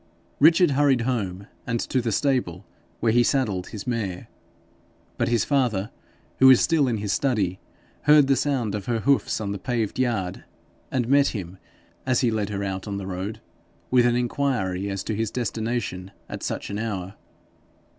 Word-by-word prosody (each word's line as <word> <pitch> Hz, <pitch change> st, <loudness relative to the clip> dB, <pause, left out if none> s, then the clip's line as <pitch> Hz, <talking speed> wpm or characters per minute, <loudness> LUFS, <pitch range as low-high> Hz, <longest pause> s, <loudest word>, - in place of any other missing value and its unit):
Richard 165 Hz, +2 st, +6 dB
hurried 135 Hz, -3 st, +3 dB
home, 100 Hz, -6 st, -2 dB, 0.2 s
and 115 Hz, -1 st, 0 dB
to 130 Hz, -, 0 dB
the 115 Hz, -1 st, -1 dB
stable, 105 Hz, -, 0 dB, 0.4 s
where 115 Hz, -, +3 dB
he 120 Hz, +2 st, +4 dB
saddled 115 Hz, -8 st, 0 dB
his 105 Hz, -2 st, -7 dB
mare. 110 Hz, -7 st, -3 dB, 0.9 s
But -, -, +1 dB
his 120 Hz, -3 st, +1 dB
father, 120 Hz, -8 st, 0 dB, 0.5 s
who 130 Hz, -, +7 dB
was 130 Hz, -2 st, +8 dB
still 160 Hz, -5 st, +3 dB
in 115 Hz, -3 st, 0 dB
his 105 Hz, -1 st, -2 dB
study, 105 Hz, -9 st, 0 dB, 0.5 s
heard 150 Hz, -1 st, +7 dB
the 135 Hz, 0 st, +3 dB
sound 130 Hz, -8 st, -1 dB
of 105 Hz, -2 st, -5 dB
her 115 Hz, -2 st, 0 dB
hoofs 140 Hz, 0 st, +1 dB
in 100 Hz, -2 st, -3 dB
the 100 Hz, -, -4 dB
paved 115 Hz, 0 st, -2 dB
yard, 110 Hz, -8 st, -1 dB, 0.5 s
and 125 Hz, -3 st, -1 dB
met 140 Hz, +1 st, +4 dB
him 95 Hz, -3 st, -5 dB, 0.4 s
as 130 Hz, -2 st, +1 dB
he 120 Hz, -3 st, +2 dB
led 105 Hz, -2 st, -1 dB
her 100 Hz, -1 st, -3 dB
out 95 Hz, 0 st, -4 dB
on 100 Hz, -1 st, -3 dB
the 100 Hz, -, -5 dB
road, 95 Hz, +4 st, -5 dB, 0.5 s
with 125 Hz, -1 st, +5 dB
an 120 Hz, -, +2 dB
inquiry 120 Hz, -7 st, -1 dB
as 95 Hz, -1 st, -3 dB
to 110 Hz, -, -3 dB
his 110 Hz, 0 st, -1 dB
destination 115 Hz, -5 st, -3 dB, 0.2 s
at -, -, -7 dB
such -, -, -4 dB
an 100 Hz, -, -3 dB
hour. 100 Hz, -4 st, -4 dB
115 Hz, 175 wpm, -24 LUFS, 100-130 Hz, 0.9 s, was